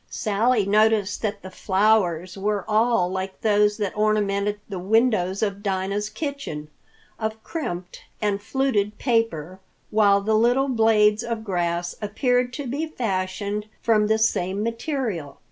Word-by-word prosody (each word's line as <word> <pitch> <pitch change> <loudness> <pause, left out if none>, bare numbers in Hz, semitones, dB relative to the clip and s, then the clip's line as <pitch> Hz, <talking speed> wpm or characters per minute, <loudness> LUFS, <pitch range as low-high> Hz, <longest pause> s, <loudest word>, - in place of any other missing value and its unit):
Sally 215 +1 +1
noticed 210 0 +2
that 210 -2 -3
the 190 - -8
flowers 185 -3 +1
were 200 0 -1
all 220 -3 +3
like 190 0 -4
those 210 -1 +3
that 205 -4 -2
ornamented 210 -1 +1
the 195 -3 -5
windows 200 -1 +2
of 200 -1 -2
Dinah's 200 +1 -1
kitchen—of 220 - -7
crimped 185 - -5 0.2
and 205 -1 0
fluted 215 -4 0
paper, 210 - -1 0.3
while 205 -2 +4
the 215 +2 0
little 245 +5 +3
blades 220 -2 +3
of 230 -1 -3
grass 175 -3 -1
appeared 245 +4 +1
to 285 - -5
be 285 +6 -2
fashioned 205 -4 -3 0.2
from 215 -2 +3
the 220 +1 +3
same 200 -2 0
material. 230 - -3
210 Hz, 130 wpm, -24 LUFS, 195-225 Hz, 0.3 s, while